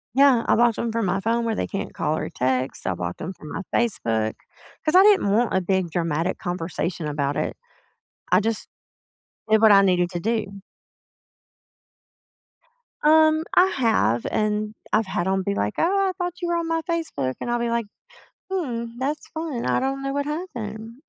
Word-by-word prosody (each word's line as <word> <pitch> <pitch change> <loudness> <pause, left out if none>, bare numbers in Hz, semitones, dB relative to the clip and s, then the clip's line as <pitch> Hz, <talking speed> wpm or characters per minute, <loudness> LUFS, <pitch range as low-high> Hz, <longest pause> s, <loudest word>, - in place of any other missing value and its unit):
Yeah, 270 -3 +5
I - - +4
blocked 235 0 +3
‘em 235 - -1
from 225 -2 -1
my 190 +2 0
phone 230 +3 0
where 225 -1 0
they - - -2
can't 195 - -5
call 155 - -1
or - - -3
text, 130 -3 -1
I 95 - 0
blocked 90 0 -5
‘em 175 - -4
from 155 -4 -12
my - - -4
Facebook. 115 - 0 0.5
'Cause 305 - +1
I 375 - +9
didn't 405 - +5
want 225 +3 +2
a 190 - +3
big 185 -1 0
dramatic 165 +1 -1
conversation 175 -1 -3
about 145 -1 -1
it. - - -2 0.7
I - - +5
just 220 0 -2 0.8
did 220 0 +4
what 220 -2 +8
I 200 - +8
needed 180 -2 +2
to 175 -2 -4
do. 210 -1 -2 2.4
Um, 315 +1 +5
I 365 - +7
have, 220 - +1
and 215 0 -1 0.2
I've 215 0 +2
had 190 -2 -2
'em 190 0 +1
be 200 +2 -1
like, 105 - -1
"Oh, 390 +3 +2
I - - -1
thought 355 -1 -2
you 345 - -1
were 345 - +1
on 335 -1 -2
my 330 0 0
Facebook," 320 - -2
and 240 - -3
I'll 240 - +1
be 235 0 -1
like, 235 -1 -1 0.6
"Hmm, 255 -12 -2
that's 285 +4 -2
fun. 315 -7 -4
I - - +2
don't 270 +1 -2
know 275 0 -2
what 285 0 -1
happened." 235 - -6
220 Hz, 190 wpm, -23 LUFS, 180-275 Hz, 2.4 s, I